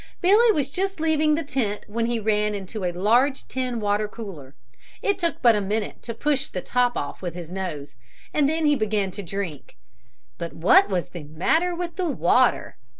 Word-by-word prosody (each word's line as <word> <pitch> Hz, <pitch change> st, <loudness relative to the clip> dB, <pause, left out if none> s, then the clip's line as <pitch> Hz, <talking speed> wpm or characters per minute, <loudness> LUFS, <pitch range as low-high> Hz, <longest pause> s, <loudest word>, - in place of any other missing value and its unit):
Billy 425 Hz, +6 st, +5 dB
was 285 Hz, -8 st, -1 dB
just 385 Hz, +1 st, -2 dB
leaving 310 Hz, -1 st, +2 dB
the 325 Hz, -, -2 dB
tent 225 Hz, -8 st, -2 dB
when 230 Hz, +2 st, -2 dB
he 235 Hz, -1 st, 0 dB
ran 210 Hz, -1 st, +1 dB
into 200 Hz, +1 st, -6 dB
a 180 Hz, -, 0 dB
large 235 Hz, +10 st, +2 dB
tin 255 Hz, -2 st, -2 dB
water 210 Hz, 0 st, 0 dB
cooler. 185 Hz, -, -9 dB, 0.5 s
It 405 Hz, -1 st, +1 dB
took 340 Hz, -2 st, -2 dB
but 235 Hz, -2 st, +6 dB
a 210 Hz, -, +1 dB
minute 210 Hz, +2 st, -3 dB
to 230 Hz, -, -6 dB
push 280 Hz, +2 st, 0 dB
the 180 Hz, -, -5 dB
top 245 Hz, -1 st, +1 dB
off 145 Hz, -, -5 dB
with 175 Hz, -2 st, -5 dB
his 175 Hz, -2 st, -8 dB
nose 150 Hz, -8 st, -5 dB, 0.4 s
and 290 Hz, -2 st, +3 dB
then 320 Hz, 0 st, 0 dB
he 295 Hz, -1 st, +4 dB
began 210 Hz, -5 st, 0 dB
to 205 Hz, -, -7 dB
drink. 180 Hz, -, -6 dB, 0.6 s
But 170 Hz, -, -5 dB
what 305 Hz, -, +5 dB
was 180 Hz, -2 st, -1 dB
the 170 Hz, -4 st, -8 dB
matter 320 Hz, -, +1 dB
with 340 Hz, -1 st, -5 dB
the 365 Hz, -3 st, 0 dB
water? 255 Hz, -1 st, +2 dB
225 Hz, 195 wpm, -24 LUFS, 190-300 Hz, 0.6 s, but